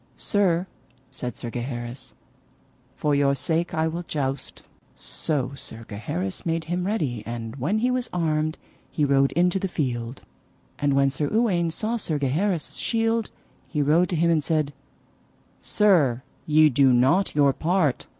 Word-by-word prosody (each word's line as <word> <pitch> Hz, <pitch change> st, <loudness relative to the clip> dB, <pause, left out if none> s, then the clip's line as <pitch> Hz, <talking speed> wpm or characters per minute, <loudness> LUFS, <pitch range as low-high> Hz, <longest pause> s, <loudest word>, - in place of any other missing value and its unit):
Sir, 185 Hz, -4 st, +1 dB, 0.5 s
said 125 Hz, -3 st, -4 dB
Sir 120 Hz, -, -6 dB
Gaheris, 120 Hz, +1 st, -5 dB, 0.8 s
for 150 Hz, -, 0 dB
your 140 Hz, -1 st, +3 dB
sake 160 Hz, +5 st, -1 dB
I 160 Hz, 0 st, +1 dB
will 165 Hz, +2 st, -3 dB
joust. 140 Hz, -5 st, -4 dB, 0.3 s
So 140 Hz, -5 st, -1 dB
Sir 115 Hz, -4 st, -6 dB
Gaheris 95 Hz, -3 st, -4 dB
made 165 Hz, -1 st, -1 dB
him 175 Hz, +3 st, -2 dB
ready, 145 Hz, -, -1 dB
and 115 Hz, +1 st, -5 dB
when 150 Hz, -, 0 dB
he 245 Hz, +3 st, +1 dB
was 250 Hz, -1 st, -1 dB
armed 155 Hz, -2 st, 0 dB, 0.3 s
he 150 Hz, -, 0 dB
rode 135 Hz, -1 st, +3 dB
into 180 Hz, +3 st, +2 dB
the 195 Hz, -, -1 dB
field. 125 Hz, -7 st, -3 dB, 0.6 s
And 145 Hz, -1 st, +1 dB
when 135 Hz, 0 st, +3 dB
Sir 145 Hz, +2 st, -1 dB
Uwaine 195 Hz, -7 st, +2 dB
saw 215 Hz, +8 st, 0 dB
Sir 160 Hz, -8 st, -1 dB
Gaheris' 155 Hz, +6 st, 0 dB
shield 225 Hz, -1 st, 0 dB, 0.4 s
he 150 Hz, -2 st, -1 dB
rode 165 Hz, +5 st, +3 dB
to 180 Hz, -, -1 dB
him 170 Hz, +1 st, +3 dB
and 155 Hz, -3 st, +2 dB
said: 155 Hz, -3 st, 0 dB, 0.9 s
Sir, 155 Hz, -, +3 dB, 0.2 s
ye 155 Hz, 0 st, +6 dB
do 135 Hz, +1 st, +4 dB
not 135 Hz, +12 st, +3 dB
your 140 Hz, -2 st, +4 dB
part. 165 Hz, -4 st, 0 dB
155 Hz, 150 wpm, -24 LUFS, 135-175 Hz, 0.9 s, ye